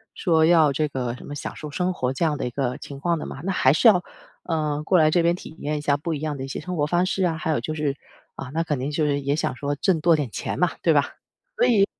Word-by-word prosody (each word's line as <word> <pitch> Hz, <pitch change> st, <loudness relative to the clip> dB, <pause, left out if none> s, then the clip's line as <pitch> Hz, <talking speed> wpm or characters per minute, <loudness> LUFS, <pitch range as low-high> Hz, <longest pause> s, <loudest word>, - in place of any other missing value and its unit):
说 160 Hz, -4 st, +3 dB
要 160 Hz, -4 st, +5 dB
这 150 Hz, +2 st, 0 dB
个 125 Hz, -3 st, -3 dB
什 -, -, -12 dB
么 145 Hz, -, -7 dB
享 -, -, -6 dB
受 150 Hz, -1 st, -8 dB
生 180 Hz, +3 st, -1 dB
活 130 Hz, -6 st, -1 dB
这 165 Hz, -, 0 dB
样 150 Hz, -3 st, 0 dB
的 -, -, -3 dB
一 -, -, -2 dB
个 125 Hz, -1 st, -2 dB
情 140 Hz, -1 st, -9 dB
况 170 Hz, +2 st, 0 dB
的 -, -, -5 dB
嘛， -, -, -7 dB
那 195 Hz, -, 0 dB
还 130 Hz, -, +4 dB
是 225 Hz, -, +4 dB
要 180 Hz, -5 st, +6 dB, 0.4 s
呃， 150 Hz, -3 st, -1 dB
过 185 Hz, +3 st, +3 dB
来 155 Hz, -1 st, +5 dB
这 175 Hz, 0 st, +3 dB
边 170 Hz, +1 st, +3 dB
体 160 Hz, -3 st, -11 dB
验 150 Hz, +1 st, -2 dB
一 -, -, -6 dB
下 145 Hz, -1 st, +2 dB
不 160 Hz, +3 st, -3 dB
一 150 Hz, -, -3 dB
样 155 Hz, 0 st, -3 dB
的 135 Hz, -, -5 dB
一 -, -, -8 dB
些 -, -, -4 dB
生 180 Hz, +4 st, -5 dB
活 145 Hz, -, +2 dB
方 175 Hz, +3 st, +2 dB
式 190 Hz, 0 st, -1 dB
啊， 165 Hz, -2 st, 0 dB
还 160 Hz, -, -2 dB
有 150 Hz, -, +1 dB
就 155 Hz, -, -3 dB
是 150 Hz, -3 st, -1 dB, 0.4 s
啊， 130 Hz, -, -7 dB
那 165 Hz, -, 0 dB
肯 150 Hz, -5 st, -2 dB
定 135 Hz, +3 st, -3 dB
就 150 Hz, +1 st, 0 dB
是 145 Hz, -1 st, 0 dB
也 140 Hz, +1 st, 0 dB
想 150 Hz, -, -1 dB
说 145 Hz, +3 st, -2 dB
挣 170 Hz, +3 st, +1 dB
多 170 Hz, 0 st, +5 dB
点 145 Hz, -5 st, -2 dB
钱 -, -, -4 dB
嘛， 180 Hz, -2 st, +3 dB
对 165 Hz, -, +3 dB
吧？ 145 Hz, -1 st, +1 dB, 0.4 s
所 -, -, +4 dB
以 205 Hz, -5 st, +4 dB
155 Hz, 325 characters per minute, -24 LUFS, 145-170 Hz, 0.4 s, 要